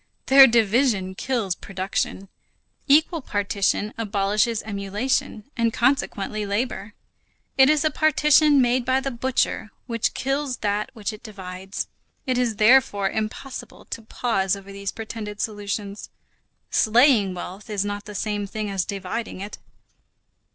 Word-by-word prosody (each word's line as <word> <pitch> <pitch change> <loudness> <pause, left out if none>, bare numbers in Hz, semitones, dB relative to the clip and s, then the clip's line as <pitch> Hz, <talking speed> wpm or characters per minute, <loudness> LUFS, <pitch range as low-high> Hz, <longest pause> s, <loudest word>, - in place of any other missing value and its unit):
Their 270 0 +9
division 225 -4 +2
kills 225 -3 -1
production. 195 +1 -3 0.6
Equal 315 +3 +4
partition 205 -1 -1
abolishes 210 +1 0
emulation; 215 +4 -2
and 230 -1 +1
consequently 225 -4 0
labor. 205 0 -3 0.6
It 265 0 +6
is 305 0 +3
a 310 - +3
partition 300 -2 +4
made 245 +1 +2
by 260 +2 +2
the 270 0 -3
butcher, 245 -2 -1 0.2
which 230 -2 -1
kills 270 -1 -1
that 205 +1 0
which 215 -1 -4
it 215 - -11
divides. 190 -3 -6 0.4
It 255 -2 0
is 240 -3 0
therefore 215 -3 +4
impossible 220 +5 -5
to 230 - -4
pause 215 -4 -1
over 200 0 -11
these 200 0 -4
pretended 215 -2 -7
solutions. 205 -1 -4 0.6
Slaying 220 -4 +4
wealth 190 +5 -8
is 205 -1 -1
not 205 0 -4
the 210 0 -9
same 205 0 -2
thing 210 0 -4
as 190 -2 -1
dividing 200 +2 -5
it. 200 +2 -7
215 Hz, 130 wpm, -23 LUFS, 200-250 Hz, 0.6 s, Their